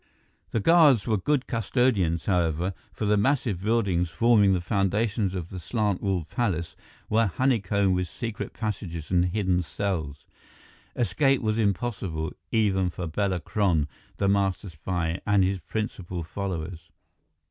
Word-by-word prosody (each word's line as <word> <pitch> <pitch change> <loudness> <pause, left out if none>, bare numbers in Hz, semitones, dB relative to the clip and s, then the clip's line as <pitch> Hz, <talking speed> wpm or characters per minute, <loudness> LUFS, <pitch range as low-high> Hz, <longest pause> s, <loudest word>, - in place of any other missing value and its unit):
The 115 - 0
guards 150 - +5
were 110 - +2
good 135 +7 0
custodians, 110 -7 +1
however, 90 -1 +1 0.2
for 110 - -4
the 105 0 +3
massive 110 -4 +1
buildings 100 -5 +1
forming 105 0 +4
the - - 0
foundations 100 +1 0
of 90 -2 -4
the 95 - -5
slant 105 +1 -1
walled 95 -5 -1
palace 85 -4 -2 0.3
were 110 +1 +3
honeycombed 100 -4 +1
with 90 0 0
secret 115 0 -5
passages 90 -8 -5
and 90 -1 +4
hidden 90 -1 +1
cells. 80 -6 -3 0.7
Escape 135 +2 +2
was 110 0 0
impossible, 95 -6 -1 0.2
even 95 -5 +2
for 90 +1 -5
Bela 95 +3 -1
Kron, 85 -5 +1 0.3
the 100 - +1
master 95 -1 +1
spy, 85 +2 -2
and 100 -2 +4
his 95 +1 0
principal 90 -2 -4
followers. 85 -2 -5
95 Hz, 135 wpm, -26 LUFS, 90-110 Hz, 0.7 s, guards